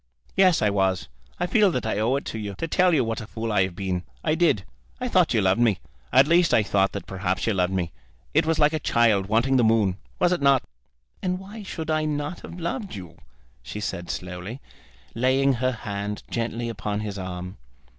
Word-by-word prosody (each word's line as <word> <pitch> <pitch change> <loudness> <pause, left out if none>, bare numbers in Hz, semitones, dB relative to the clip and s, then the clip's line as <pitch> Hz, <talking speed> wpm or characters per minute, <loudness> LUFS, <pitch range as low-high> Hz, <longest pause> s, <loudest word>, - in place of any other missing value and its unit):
"Yes, 185 - +4
I 105 - +3
was. 95 -2 0 0.3
I 180 - +1
feel 205 +3 +4
that 125 -10 -2
I 110 -2 -1
owe 115 +5 +2
it 140 - -3
you 105 -3 -5
to 165 - -3
tell 180 +2 +3
you 150 -6 +3
what 115 0 -2
a 110 - -8
fool 115 0 -4
I 105 -2 +3
have 90 -2 -7
been. 95 -2 -2 0.2
I 155 - +2
did. 160 - +2 0.3
I - - -2
thought - - +3
you - - +4
loved 95 +4 +2
me. 110 -6 +3 0.3
At 135 +1 +7
least 170 +2 +4
I 110 - +4
thought 100 -1 +1
that - - -5
perhaps 95 -1 -2
you 115 - +1
loved 90 -1 +1
me. 90 -3 -1 0.4
It - - +3
was 165 -1 +2
like 150 +1 +4
a 155 - 0
child 110 -8 +2
wanting 120 +5 +3
the 125 - +4
moon; 110 -5 +3 0.2
was 175 - +3
it 180 - 0
not?" 140 -2 +4 0.6
"And 180 -1 -1
why 200 +4 -9
should 160 -5 -4
I 155 0 +1
not 150 +3 -2
have 175 - -9
loved 190 - -3
you?" 90 -4 -10 0.4
she 105 - -7
said 95 -4 -4
slowly, 90 +7 -5 0.5
laying 130 +3 +3
her 130 +1 0
hand 105 -3 -5
gently 115 0 -2
upon 105 -2 -3
his 105 -2 -5
arm. 90 +1 -6
115 Hz, 215 wpm, -25 LUFS, 100-155 Hz, 0.6 s, At